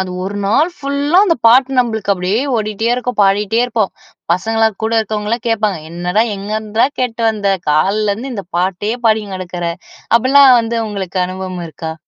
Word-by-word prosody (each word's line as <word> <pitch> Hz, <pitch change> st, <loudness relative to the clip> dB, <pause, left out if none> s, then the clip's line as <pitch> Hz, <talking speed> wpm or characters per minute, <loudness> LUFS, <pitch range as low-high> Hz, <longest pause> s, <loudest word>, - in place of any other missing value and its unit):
அது 190 Hz, -1 st, -3 dB
ஒரு 200 Hz, +2 st, -4 dB
நாள் 295 Hz, -, +2 dB
ஃபுல்லா 285 Hz, +4 st, 0 dB
அந்த 335 Hz, -, +2 dB
பாட்டு 255 Hz, +3 st, +4 dB
நம்மளுக்கு 220 Hz, -4 st, 0 dB
அப்பிடியே 190 Hz, +5 st, -1 dB, 0.2 s
ஓடிட்டே 215 Hz, +1 st, -2 dB
இருக்கும். 250 Hz, -2 st, -4 dB
பாடிட்டே 205 Hz, +3 st, +2 dB
இருப்போம். 225 Hz, -5 st, -1 dB, 0.4 s
பசங்கள்லாம் 220 Hz, +2 st, 0 dB
கூட 220 Hz, +1 st, -1 dB
இருக்கவங்கலாம் 215 Hz, +2 st, -3 dB
கேட்பாங்க. 215 Hz, -5 st, 0 dB
"என்னடா 180 Hz, +5 st, 0 dB
எங்கேருந்துடா 215 Hz, +3 st, -1 dB
கேட்டு 235 Hz, -2 st, -2 dB
வந்த, 205 Hz, -2 st, -1 dB, 0.2 s
கால்ல 200 Hz, +7 st, +2 dB
இருந்து 250 Hz, +5 st, -6 dB
இந்த 200 Hz, -, -5 dB
பாட்டயே 195 Hz, +5 st, -1 dB
பாடிங் 215 Hz, -3 st, +1 dB
கெடக்கிற" 180 Hz, -1 st, -6 dB, 0.5 s
அப்படில்லாம் 260 Hz, +1 st, +6 dB
வந்து 230 Hz, 0 st, -3 dB
உங்களுக்கு 195 Hz, -2 st, -4 dB
அனுபவம் 185 Hz, -1 st, -6 dB
இருக்கா? 160 Hz, +1 st, -6 dB
215 Hz, 155 wpm, -16 LUFS, 195-235 Hz, 0.5 s, அப்படில்லாம்